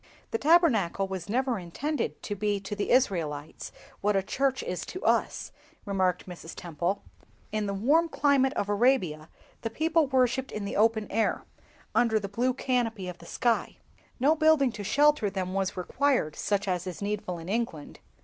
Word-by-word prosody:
"The 455 - -1
Tabernacle 250 - +3
was 190 -1 -6
never 250 0 0
intended 275 - -3
to 205 - -3
be 205 0 0
to 200 +1 -5
the 205 - -2
Israelites 165 - 0 0.3
what 205 0 +1
a 195 - +2
church 265 +6 0
is 180 - -3
to 370 - -7
us," - - +1 0.3
remarked 190 -3 0
Mrs. 175 -2 -9
Temple. 175 +4 -3 0.5
"In 215 -1 -1
the 200 - -2
warm 300 +11 +3
climate 280 -3 +3
of 205 - -1
Arabia 200 - +1 0.3
the 225 - -2
people 320 +5 +2
worshipped 260 0 +1
in 210 -1 -4
the 200 - -4
open 220 0 +3
air, 225 - 0 0.5
under 225 -2 +3
the 200 - -5
blue 245 +5 0
canopy 230 -7 -1
of 180 -1 -7
the - - -13
sky; 235 -2 0 0.4
no 280 +5 +4
building 310 -4 +4
to 210 -2 -7
shelter 290 0 +3
them 185 -1 -3
was 195 0 -1
required, 245 - 0
such 200 -1 -1
as 180 -1 -1
is 180 +1 -5
needful 205 -3 -3
in 165 0 -9
England. 200 -8 -3
210 Hz, 170 wpm, -28 LUFS, 190-260 Hz, 0.5 s, no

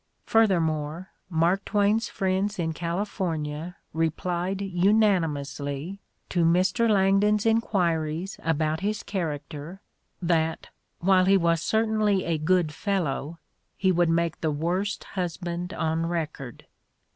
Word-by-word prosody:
Further 220 -6 +4
more, 155 +2 -2 0.2
Mark 175 +3 +2
Twain 205 +1 +2
's 225 - -5
friends 195 +1 -1
in 165 -2 -1
California 170 -2 -3 0.2
replied 175 +3 -1
unani 195 -1 +3
mously 145 +5 -5 0.3
to 175 -2 +1
Mr. 185 +7 +3
Langdon 200 +1 +4
's 210 - -5
enquiries 180 -6 0
about 155 -1 0
his 210 +3 -2
character, 155 -1 -5 0.4
that, 165 -2 0 0.3
while 185 0 +4
he 195 +1 +5
was 170 -2 +2
certainly 215 -2 +1
a 165 -2 0
good 160 -1 +2
fellow, 165 -4 -2 0.4
he 190 -1 +2
would 175 -1 +2
make 165 0 0
the 160 - +1
"worst 175 +7 -1
husband 175 -1 -4
on 165 -1 -1
record." 155 -7 -4
175 Hz, 120 wpm, -26 LUFS, 160-195 Hz, 0.4 s, he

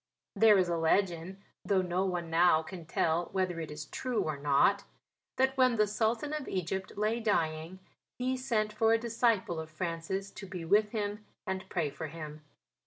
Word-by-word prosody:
There 210 0 +6
is 185 -1 +3
a 170 -1 0
legend 175 +2 +1 0.2
though 195 -2 +2
no 180 +1 0
one 175 -3 -3
now 165 -1 +5
can 170 0 -9
tell 165 0 +1
whether 185 -3 0
it 160 - -5
is 150 0 -6
true 250 - -2
or 155 - -2
not 145 +8 +3 0.5
that 265 +1 +2
when 255 -2 +4
the 215 -1 +4
Sultan 225 +7 -1
of 305 -3 -3
Egypt 190 +2 -3
lay 215 +3 +1
dying 165 -5 -1 0.4
he 255 +1 0
sent 225 -5 -1
for 225 +1 +3
a - - +5
disciple 230 -6 +1
of 160 0 -6
Francis 170 +4 -3
to 195 - -9
be 180 -3 -6
with 210 +4 +4
him 210 -1 -3 0.2
and 190 -1 -4
pray 160 -6 -1
for 160 - -6
him. 155 -1 -8
190 Hz, 180 wpm, -31 LUFS, 165-215 Hz, 0.5 s, There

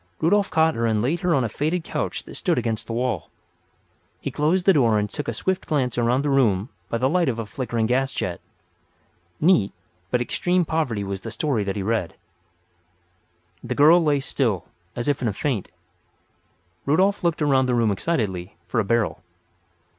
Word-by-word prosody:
Rudolf 200 +4 +2
caught 160 0 +3
her 115 -3 0
and 110 -1 +1
laid 140 +10 0
her 180 -3 +2
on 135 - +2
a - - 0
faded 155 - -1
couch - - -3
that - - -11
stood - - 0
against 110 -2 -2
the 115 - -4
wall. 120 -6 -2 0.9
He - - -4
closed 175 +5 +1
the 195 - +6
door 115 -8 +3
and 105 0 0
took 145 +8 -6
a - - 0
swift 190 -1 -2
glance 135 -6 0
around 120 +3 +1
the 145 - 0
room 115 -6 +2 0.2
by 115 - 0
the 130 +3 +2
light 170 +1 +2
of 120 - -2
a 115 - -3
flickering 115 +1 -2
gas 130 +3 +1
jet. 90 -7 -3 1.0
Neat, 155 - +4 0.4
but 125 - +1
extreme 180 +8 +1
poverty 140 -11 -1
was 95 -1 -4
the 115 - -6
story 115 0 -1
that 95 - -2
he 100 - -2
read. 110 -5 -1 1.5
The 125 +1 -3
girl 160 +4 +6
lay 145 -2 +2
still, 115 - -1 0.3
as 120 - -3
if 145 -2 +1
in 120 - 0
a 105 - 0
faint. 120 -4 -2 1.2
Rudolf 190 +8 +2
looked 170 -3 +1
around 135 -3 +3
the 125 - +1
room 115 -3 +2
excitedly 100 - -2
for 90 +6 -1
a - - +2
barrel. 115 +2 0
125 Hz, 190 wpm, -23 LUFS, 110-155 Hz, 1.5 s, the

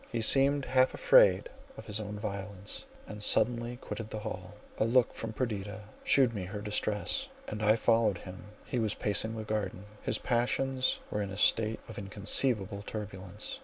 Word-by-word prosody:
He 120 - -1
seemed 135 +4 +5
half 130 0 +3
afraid - - +5 0.3
of - - -9
his 105 0 -2
own 105 -1 -5
violence, 100 -1 -5 0.2
and 105 -1 -9
suddenly 120 +3 +2
quitted 115 -2 -7
the 110 -1 -5
hall: 95 0 -7 0.2
a - - +3
look 120 +1 +3
from 115 - -5
Perdita 105 -4 -4 0.2
shewed 130 -4 +4
me 100 -4 -4
her 105 +3 -6
distress, 105 0 0 0.2
and 105 0 -5
I 105 +1 +4
followed 115 -3 +2
him. 90 +1 -10 0.2
He 125 - -2
was 110 -2 0
pacing 110 +2 -1
the 110 - -4
garden: 105 -3 -3 0.2
his - - 0
passions 130 +2 0
were 105 - -1
in 100 - -3
a 95 - -7
state 110 +1 +3
of 110 -3 -8
inconceivable 100 +1 +1
turbulence. 100 -1 -5
110 Hz, 170 wpm, -30 LUFS, 100-120 Hz, 0.3 s, seemed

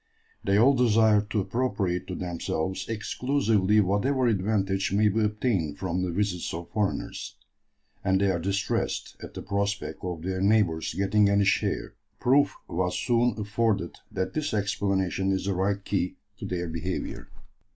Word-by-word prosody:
"They 100 0 +2
all 125 +6 +6
desire 110 -4 +4
to 105 - +1
appropriate 95 -4 -1
to 90 - -4
themselves 90 +1 -3
exclusively 110 -2 +1
whatever 115 +8 +1
advantage 100 -3 +1
may 105 +2 +4
be 105 +3 0
obtained 105 - 0
from 90 -1 -2
the 90 - -1
visits 90 -2 -1
of 85 0 -7
foreigners, 105 -3 -2 0.7
and 95 -1 +2
they 100 -1 +3
are 85 - -1
distressed 95 +3 -1
at - - -9
the - - -6
prospect 100 0 -2
of 90 -3 -4
their 95 0 -2
neighbours 100 -6 +2
getting 100 +1 +3
any 100 0 +3
share." 100 - 0 0.3
Proof 140 +3 +3
was 90 +1 -1
soon 120 -2 +2
afforded 105 -4 0 0.2
that 95 - -2
this 150 -7 -1
explanation 95 -2 0
is 95 0 -1
the 100 - 0
right 100 +2 -1
key 90 -2 -1 0.2
to - - -5
their 90 -1 -2
behaviour. 85 +3 -4
100 Hz, 150 wpm, -27 LUFS, 95-110 Hz, 0.7 s, all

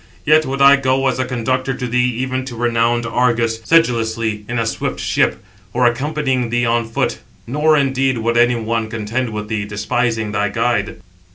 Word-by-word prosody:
Yet 155 +1 +4
would 135 +1 0
I 140 0 +8
go 135 0 0
as 130 - -3
a 130 - 0
conductor 130 +1 -2
to 125 - -4
thee 125 +1 +1
even 130 0 -2
to 125 -3 -7
renowned 120 0 +1
Argos, 115 -1 0
sedulously, 115 -8 +1
in 120 - -2
a 115 - 0
swift 115 - -3
ship, - - 0 0.3
or 125 0 +2
accompanying 130 0 0
thee 120 +1 0
on 115 -1 0
foot; 115 - -1 0.3
nor, 150 +5 +2
indeed, 135 -2 +1
would 115 +1 -1
any 120 +1 +4
one 115 -1 -2
contend 115 +3 -3
with 105 -1 -5
thee, 105 -1 -2
despising 110 +1 -1
thy 105 0 0
guide." - - -1
120 Hz, 180 wpm, -18 LUFS, 115-130 Hz, 0.3 s, I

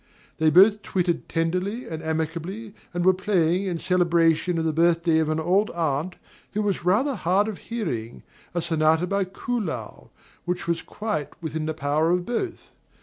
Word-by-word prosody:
They 160 0 +4
both 200 +6 +6
twittered 180 -4 -1
tenderly 180 +8 -1
and 160 -1 -5
amicably, 165 +7 -3 0.2
and 175 0 -2
were 185 - +6
playing, 185 -1 +1
in 180 -3 -2
celebration 170 -1 +2
of 165 - 0
the 160 - +1
birthday 165 0 +3
of 155 -1 +1
an 155 0 0
old 185 +6 +2
aunt 160 +1 -1 0.4
who 210 +1 0
was 200 -4 -1
rather 220 +11 +2
hard 190 0 +1
of 215 -4 -5
hearing, 140 - -4 0.3
a 175 - 0
sonata 160 +1 +2
by 200 +1 0
Kuhlau, 185 - -4 0.4
which 180 -1 -3
was 170 -1 0
quite 210 -9 -3
within 160 -1 -3
the 160 - -2
power 155 +2 +1
of 175 0 +1
both. 290 +9 -4
175 Hz, 165 wpm, -25 LUFS, 160-195 Hz, 0.4 s, both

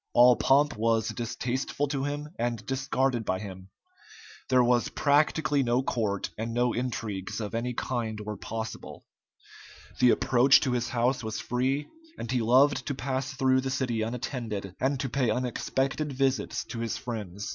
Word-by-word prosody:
All 125 +1 +8
pomp 145 +4 +3
was 115 0 +1
distasteful 125 +4 -2
to 140 -2 -1
him, 145 +1 -4
and 120 -1 -2
discarded 130 -2 0
by 95 -3 -1
him. 95 -1 -9 0.8
There 130 -1 +5
was 120 0 +2
practically 145 0 +2
no 125 0 +1
court, 105 -6 -1
and 115 +1 -3
no 120 0 +2
intrigues 115 -6 -3
of 105 -1 -4
any 120 +1 -2
kind 115 -4 -2
were 105 0 -5
possible. 110 +3 -6 0.9
The 125 - +6
approach 130 +3 +5
to 130 - 0
his 120 -1 -1
house 125 +2 +1
was 110 0 -3
free, 130 +4 -1 0.3
and 115 - -5
he 125 -2 +1
loved 130 +4 +4
to 140 - -1
pass 135 +1 -2
through 130 -1 +3
the 135 - -3
city 130 -4 -1
unattended, 110 -4 -4
and 135 +1 0
to 135 - -1
pay 130 -1 0
unexpected 130 +4 -1
visits 135 -4 0
to 115 - -5
his 115 -1 -2
friends. 105 -5 -5
125 Hz, 160 wpm, -28 LUFS, 115-135 Hz, 0.9 s, All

